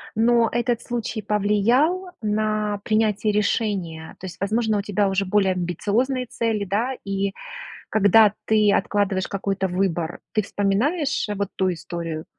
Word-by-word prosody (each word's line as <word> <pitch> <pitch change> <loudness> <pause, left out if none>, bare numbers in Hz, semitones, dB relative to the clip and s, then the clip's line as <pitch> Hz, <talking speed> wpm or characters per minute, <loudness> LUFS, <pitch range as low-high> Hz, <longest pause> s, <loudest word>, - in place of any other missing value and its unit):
Но 230 +1 +4
этот 240 0 0
случай 235 -2 -4
повлиял 220 - +2
на 215 -1 0
принятие 215 -1 +1
решения? 200 -6 -1
То 190 - -6
есть, 180 - -9
возможно, 215 +2 +1
у - - -1
тебя 205 0 0
уже 195 0 0
более 195 0 +2
амбициозные 205 - -1
цели, 225 -3 -1
да? 220 +7 -1
И 195 0 -1 0.6
когда 210 0 +5
ты 215 -2 +4
откладываешь 200 -1 0
какой-то 195 -1 -2
выбор, 175 -2 -1
ты 215 - +1
вспоминаешь 235 - 0
вот 200 -1 -1
ту 185 -1 +1
историю? 165 -2 -5
205 Hz, 135 wpm, -23 LUFS, 195-225 Hz, 0.6 s, когда